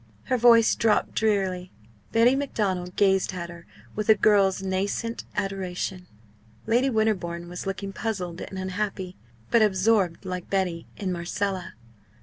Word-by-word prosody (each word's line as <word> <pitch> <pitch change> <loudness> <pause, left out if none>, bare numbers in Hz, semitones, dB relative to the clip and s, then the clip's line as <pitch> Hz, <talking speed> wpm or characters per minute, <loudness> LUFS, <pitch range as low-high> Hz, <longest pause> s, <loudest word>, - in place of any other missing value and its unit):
Her 255 - 0
voice 230 -1 +6
dropped 225 -2 +1
drearily. 190 -4 0 0.4
Betty 235 +3 +5
Macdonald 190 -10 -2
gazed 195 -1 +2
at 170 -1 -5
her 170 -1 -13 0.3
with 215 +1 -3
a 220 - +8
girl's 195 -2 +3
nascent 200 +5 -2
adoration. 190 -2 -3 0.6
Lady 245 +4 +2
Winterbourne 190 -7 0
was 180 +2 -6
looking 195 0 -4
puzzled 185 -6 -4
and 190 - -7
unhappy, 190 -1 -3 0.4
but 235 - +5
absorbed 195 -3 +2
like 180 -1 -5
Betty 180 -4 -1
in 190 -2 -2
Marcella. 180 +2 -3
195 Hz, 135 wpm, -26 LUFS, 180-215 Hz, 0.6 s, a